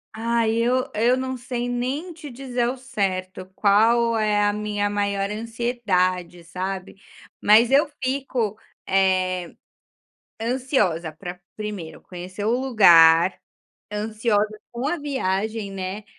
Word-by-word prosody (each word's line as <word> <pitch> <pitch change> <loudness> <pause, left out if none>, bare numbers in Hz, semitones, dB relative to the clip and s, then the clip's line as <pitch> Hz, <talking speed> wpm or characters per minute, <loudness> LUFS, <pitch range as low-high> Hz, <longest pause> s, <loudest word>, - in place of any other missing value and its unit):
Ai, 230 0 +1
eu 250 +2 +1
eu 235 +4 +3
não 260 0 -3
sei 245 0 -4
nem 260 +8 -3
te 310 -2 -10
dizer 250 -1 -4
ao 260 - -4
certo 190 -6 -3
qual 230 +3 +3
é 210 -1 +2
a 205 - +2
minha 210 -1 -1
maior 200 -1 -1
ansiedade, 210 -6 -1
sabe. 185 +3 -5 0.4
Mas 225 +4 +5
eu 280 +3 +5 0.2
fico, 255 -5 -1 0.3
eh, 185 -2 +1 0.9
ansiosa 230 - 0
para 175 +3 -8 0.2
1º 205 -7 -6
conhecer 185 +3 -7
o - - +2
lugar, 175 -8 +6 0.5
ansiosa 215 0 0
com 240 +3 -4
a 325 +4 0
viagem, 220 -7 -2
né, 195 +2 -5
215 Hz, 120 wpm, -23 LUFS, 190-245 Hz, 0.9 s, lugar